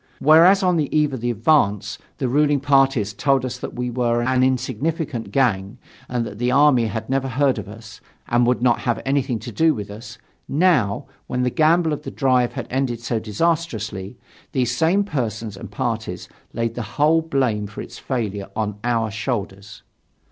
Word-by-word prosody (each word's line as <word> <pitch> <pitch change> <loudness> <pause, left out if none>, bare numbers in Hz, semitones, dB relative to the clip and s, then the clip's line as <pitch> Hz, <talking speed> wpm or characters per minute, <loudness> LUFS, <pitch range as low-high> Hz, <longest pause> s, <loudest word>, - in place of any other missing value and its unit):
Whereas, 170 +7 +6
on 180 -2 +3
the 150 -3 0
eve 150 -2 +2
of 130 - -5
the 120 - -1
advance, 105 -4 +1 0.2
the 135 - -1
ruling 145 +2 +2
parties 135 -6 +2
told 135 +4 +1
us 125 0 -5
that - - -7
we 125 0 -3
were 120 -1 0
an 130 +1 +2
insignificant 130 +1 -1
gang 105 -5 0 0.3
and 120 -1 -1
that 105 - -8
the 125 +1 +1
army 130 -3 +4
had 110 +1 -4
never 135 0 0
heard 130 -1 +1
of 100 - -7
us 110 0 -12 0.3
and 120 0 +2
would 125 0 +1
not 120 -2 +3
have 120 - -1
anything 135 -3 0
to 120 +2 -8
do 160 +6 +2
with 100 -1 -6
us, 110 +3 -10 0.3
now, 145 - +2 0.2
when 125 0 -1
the 125 - +1
gamble 160 0 +3
of 150 - -4
the - - -6
drive 125 -3 +1
had - - -5
ended 130 -3 -1
so 115 -1 -2
disastrously, 110 - -2 0.4
these 125 -2 0
same 170 +9 +2
persons 115 - -3
and 95 - -9
parties - - -3 0.2
laid 115 0 -2
the 120 - -4 0.2
whole 155 +3 +4
blame 130 -10 -1
for 105 - -7
its - - -11
failure 105 -6 -3
on 105 -2 -3
our 115 -2 0
shoulders. 105 -3 -5
125 Hz, 185 wpm, -21 LUFS, 110-140 Hz, 0.4 s, Whereas